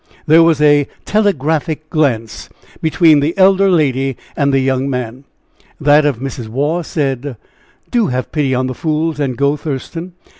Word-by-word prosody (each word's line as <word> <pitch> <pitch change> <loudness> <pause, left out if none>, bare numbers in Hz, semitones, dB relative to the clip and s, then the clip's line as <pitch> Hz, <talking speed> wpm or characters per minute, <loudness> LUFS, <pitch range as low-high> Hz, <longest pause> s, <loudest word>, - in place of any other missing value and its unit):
There 160 +2 +6
was 165 -2 +3
a 145 -1 +4 0.2
telegraphic 160 -6 0
glance 120 -8 -1 0.3
between 160 -1 +4
the 155 +6 -1
elder 195 +1 +4
lady 135 -6 +1 0.2
and 140 -1 +1
the 135 - +2
young 130 0 0
man. 125 0 -5 0.5
That 150 0 +4
of 140 -5 -1
Mrs. 130 -2 -6
Waugh 145 +9 -1
said: 140 -5 -3 0.5
"Do 235 -3 +2
have 130 -1 -3
pity 140 -4 0
on 130 +1 0
the 130 - -3
fools, 155 +2 -2
and 130 -4 -2
go, 140 +1 +1
Thurston." 160 +5 -6
145 Hz, 155 wpm, -15 LUFS, 130-160 Hz, 0.5 s, There